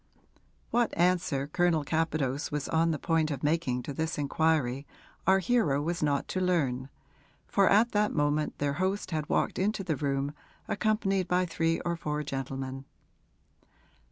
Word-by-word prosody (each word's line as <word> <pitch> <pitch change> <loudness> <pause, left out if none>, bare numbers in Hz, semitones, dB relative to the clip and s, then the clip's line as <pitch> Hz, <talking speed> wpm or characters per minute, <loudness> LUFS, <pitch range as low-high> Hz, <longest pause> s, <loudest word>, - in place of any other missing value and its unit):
What 240 -1 +1
answer 170 -6 +2
Colonel 165 +1 +1
Capadose 155 -3 -1
was 150 -1 -2
on 165 0 +2
the 160 - 0
point 160 0 +1
of 140 -3 -4
making 145 -5 0
to 140 - -5
this 160 +3 -2
inquiry 145 -2 +1 0.4
our 190 0 +6
hero 190 - +2
was 170 +3 -2
not 145 -2 +1
to 185 - -1
learn, 140 -8 0 0.6
for 200 -1 +3
at 225 +4 +4
that 210 0 +2
moment 145 0 0
their 145 -1 0
host 190 +1 -1
had 155 -2 -2
walked - - 0
into 200 +1 0
the 165 -4 -1
room 140 +1 -1 0.3
accompanied 200 -4 0
by 180 +1 +2
three 165 -1 0
or 175 -1 -1
four 150 -2 -3
gentlemen. 135 -1 -5
160 Hz, 155 wpm, -29 LUFS, 140-180 Hz, 0.6 s, our